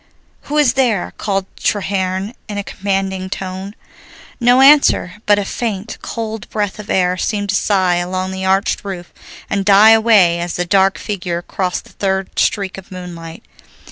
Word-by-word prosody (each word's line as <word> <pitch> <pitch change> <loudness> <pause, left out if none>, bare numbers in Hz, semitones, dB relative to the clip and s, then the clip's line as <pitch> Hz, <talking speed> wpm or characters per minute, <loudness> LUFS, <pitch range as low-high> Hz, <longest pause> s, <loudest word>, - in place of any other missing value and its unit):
"Who 300 - -1
is 285 -5 +4
there?" 245 -8 0
called 195 -2 -1
Treherne 190 0 -1
in 205 - -5
a 205 - -2
commanding 190 -1 -3
tone. 190 +2 -6 0.6
No 245 +1 +4
answer, 270 - +5
but 205 0 +5
a 205 - -1
faint, 220 -1 -4
cold 220 -2 -5
breath 205 -2 -3
of 210 - -9
air 180 -1 +1
seemed 205 +1 -2
to 200 - +1
sigh 185 -4 +2
along 185 +1 -2
the 190 0 -5
arched 190 +1 +1
roof 185 -3 -7 0.3
and 200 0 -1
die 205 +2 +7
away 215 -7 +5
as 175 0 -3
the 180 - -1
dark 195 +1 +3
figure 175 -4 -4
crossed 180 0 -3
the - - -18
third 190 -1 -2
streak 195 -2 0
of 190 +1 -16
moonlight. 170 -3 -9
195 Hz, 165 wpm, -17 LUFS, 185-210 Hz, 0.6 s, die